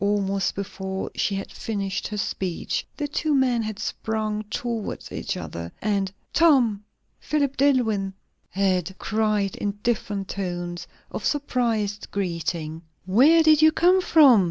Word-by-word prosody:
Almost 200 Hz, -2 st, 0 dB
before 190 Hz, -1 st, -4 dB
she 200 Hz, -, 0 dB
had 195 Hz, -, -5 dB
finished 200 Hz, -3 st, -3 dB
her 210 Hz, -, -5 dB
speech 190 Hz, -3 st, -2 dB
the 295 Hz, -, -2 dB
two 295 Hz, +1 st, 0 dB
men 255 Hz, -3 st, +2 dB
had 215 Hz, -2 st, -4 dB
sprung 215 Hz, 0 st, -2 dB
towards 230 Hz, -1 st, -4 dB
each -, -, -3 dB
other, 85 Hz, 0 st, -6 dB
and 200 Hz, -2 st, 0 dB, 0.2 s
"Tom!" 255 Hz, -11 st, +4 dB, 0.4 s
"Philip 285 Hz, -3 st, 0 dB
DilIwyn!" 230 Hz, -8 st, +2 dB, 0.4 s
had 185 Hz, -3 st, +1 dB
been 190 Hz, -, -8 dB
cried 215 Hz, -2 st, 0 dB
in 205 Hz, -1 st, -2 dB
different 210 Hz, -4 st, -1 dB
tones 175 Hz, -3 st, -4 dB, 0.2 s
of -, -, -5 dB
surprised 230 Hz, -8 st, -1 dB
greeting. 170 Hz, -4 st, -3 dB, 0.2 s
"Where 275 Hz, -, +6 dB
did 310 Hz, -1 st, +6 dB
you 315 Hz, 0 st, +7 dB
come 360 Hz, +4 st, +4 dB
from?" 290 Hz, -, +7 dB
210 Hz, 135 wpm, -24 LUFS, 195-255 Hz, 0.4 s, you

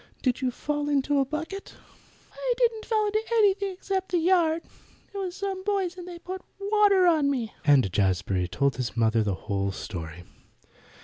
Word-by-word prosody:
"Did 255 Hz, 0 st, +1 dB
you 260 Hz, -, +1 dB
fall 295 Hz, +3 st, -2 dB
into 285 Hz, 0 st, +2 dB
a 270 Hz, -, +3 dB
bucket?" 320 Hz, +8 st, -6 dB, 0.6 s
"I -, -, -1 dB
didn't 460 Hz, -3 st, +1 dB
fall 435 Hz, -2 st, +2 dB
into 425 Hz, +1 st, +1 dB
anything 405 Hz, -3 st, +3 dB
except 380 Hz, 0 st, -3 dB
the 360 Hz, -, +2 dB
yard. 335 Hz, -2 st, +3 dB, 0.5 s
It -, -, -6 dB
was 370 Hz, -2 st, -3 dB
some 390 Hz, -1 st, -4 dB
boys 385 Hz, -3 st, 0 dB
and 360 Hz, -1 st, -9 dB
they 350 Hz, -1 st, -7 dB
put 370 Hz, +2 st, -7 dB, 0.2 s
water 400 Hz, -2 st, +4 dB
on 315 Hz, -5 st, +4 dB
me," 245 Hz, -6 st, -2 dB
and 135 Hz, -, +5 dB
Jazbury 95 Hz, -1 st, +1 dB
told 140 Hz, +9 st, 0 dB
his 125 Hz, -1 st, -3 dB
mother 115 Hz, 0 st, +3 dB
the 100 Hz, -3 st, 0 dB
whole 100 Hz, -1 st, -1 dB
story. 90 Hz, -4 st, -7 dB
330 Hz, 175 wpm, -26 LUFS, -, 0.6 s, and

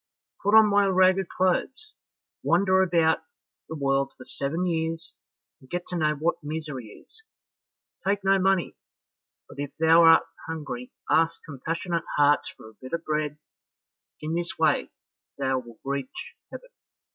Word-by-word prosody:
Put 205 Hz, +2 st, +3 dB
on 220 Hz, -1 st, +8 dB
my 205 Hz, -1 st, +3 dB
ragged 185 Hz, 0 st, +3 dB
clothes, 260 Hz, -, -1 dB, 0.5 s
wander 190 Hz, +2 st, +3 dB
about 170 Hz, -3 st, +3 dB, 0.5 s
the 160 Hz, -, -5 dB
world 135 Hz, -1 st, 0 dB
for 130 Hz, -, -12 dB
seven 160 Hz, +6 st, -3 dB
years, 165 Hz, -1 st, -2 dB, 0.5 s
and 130 Hz, -3 st, -20 dB
get 175 Hz, 0 st, -3 dB
to 180 Hz, -, -4 dB
know 155 Hz, -2 st, +1 dB
what 160 Hz, +4 st, 0 dB
misery 150 Hz, -4 st, -5 dB
is, 445 Hz, -, -16 dB, 0.8 s
take 200 Hz, +1 st, 0 dB
no 195 Hz, 0 st, +4 dB
money, 190 Hz, -1 st, +1 dB, 0.7 s
but -, -, -13 dB
if 145 Hz, -1 st, -5 dB
thou 160 Hz, +1 st, +6 dB
art 165 Hz, -1 st, +7 dB, 0.2 s
hungry 145 Hz, -6 st, -6 dB, 0.2 s
ask 165 Hz, +1 st, +2 dB
compassionate 165 Hz, +4 st, -3 dB
hearts 145 Hz, 0 st, +3 dB
for -, -, -14 dB
a 110 Hz, -, -15 dB
bit 130 Hz, +3 st, -10 dB
of 170 Hz, 0 st, -2 dB
bread; 150 Hz, -1 st, -1 dB, 0.8 s
in 155 Hz, +1 st, -3 dB
this 170 Hz, 0 st, -3 dB
way -, -, +2 dB, 0.5 s
thou 135 Hz, -1 st, 0 dB
wilt 120 Hz, -2 st, -13 dB
reach 140 Hz, -, -5 dB, 0.2 s
heaven." -, -, -10 dB
165 Hz, 145 wpm, -26 LUFS, 145-185 Hz, 0.8 s, on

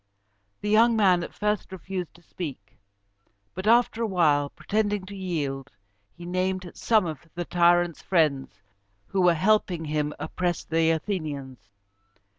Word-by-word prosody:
The 210 Hz, -, -2 dB
young 230 Hz, +2 st, +5 dB
man 190 Hz, -5 st, +4 dB
at -, -, -7 dB
first 210 Hz, -1 st, -2 dB
refused 185 Hz, -1 st, -6 dB
to 175 Hz, -, -19 dB
speak; 135 Hz, -, -8 dB, 0.7 s
but 185 Hz, +3 st, -5 dB
after 235 Hz, 0 st, +4 dB
a 230 Hz, -, +1 dB
while, 150 Hz, -7 st, +2 dB
pretending 205 Hz, +1 st, -1 dB
to 200 Hz, +1 st, -9 dB
yield, 145 Hz, -8 st, -3 dB, 0.5 s
he 175 Hz, -, -9 dB
named 185 Hz, 0 st, -2 dB
some 220 Hz, -4 st, +2 dB
of 160 Hz, 0 st, -6 dB
the 175 Hz, 0 st, -3 dB
tyrants' 175 Hz, -1 st, +3 dB
friends 150 Hz, -, 0 dB, 0.4 s
who 190 Hz, -, -1 dB
were 175 Hz, -1 st, +5 dB
helping 185 Hz, -2 st, +1 dB
him 150 Hz, -1 st, -1 dB
oppress 175 Hz, -2 st, -2 dB
the 165 Hz, 0 st, +1 dB
Athenians. 150 Hz, -, -3 dB
175 Hz, 140 wpm, -26 LUFS, 155-195 Hz, 0.7 s, young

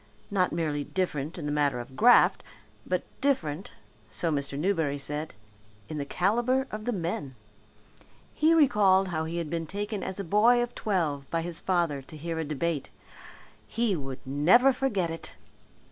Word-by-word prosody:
Not 185 Hz, -2 st, +2 dB
merely 155 Hz, -3 st, -1 dB
different 155 Hz, -3 st, -2 dB
in 160 Hz, -, -5 dB
the 145 Hz, -, -1 dB
matter 145 Hz, -4 st, +1 dB
of 125 Hz, +2 st, -9 dB
graft, 245 Hz, -, +5 dB, 0.4 s
but -, -, 0 dB, 0.2 s
different, 185 Hz, -, -1 dB, 0.4 s
so 120 Hz, +10 st, -1 dB
Mr. 140 Hz, -1 st, -2 dB
Newberry 160 Hz, -4 st, 0 dB
said, 150 Hz, +1 st, -3 dB, 0.5 s
in 155 Hz, -, -4 dB
the 140 Hz, -, -2 dB
calibre 240 Hz, -, +1 dB
of 215 Hz, 0 st, -6 dB
the 245 Hz, -, 0 dB
men. 165 Hz, -, -3 dB, 1.0 s
He 315 Hz, +1 st, +3 dB
recalled 195 Hz, -, +4 dB
how 160 Hz, -2 st, -2 dB
he 165 Hz, +2 st, -4 dB
had 165 Hz, -3 st, -3 dB
been 165 Hz, -1 st, -2 dB
taken 205 Hz, +3 st, -4 dB
as 190 Hz, -, -5 dB
a -, -, -2 dB
boy 225 Hz, +7 st, +4 dB
of 240 Hz, 0 st, -6 dB
twelve 155 Hz, -9 st, -1 dB
by 165 Hz, -1 st, -1 dB
his 170 Hz, -1 st, -2 dB
father 170 Hz, -7 st, 0 dB
to 155 Hz, +4 st, -11 dB
hear 165 Hz, +1 st, -4 dB
a -, -, 0 dB
debate. 155 Hz, 0 st, -2 dB, 0.8 s
He 230 Hz, -4 st, 0 dB
would 135 Hz, -4 st, -6 dB
never 180 Hz, -, +5 dB
forget 200 Hz, -11 st, -1 dB
it. 165 Hz, -, -6 dB
170 Hz, 165 wpm, -28 LUFS, 150-205 Hz, 1.0 s, graft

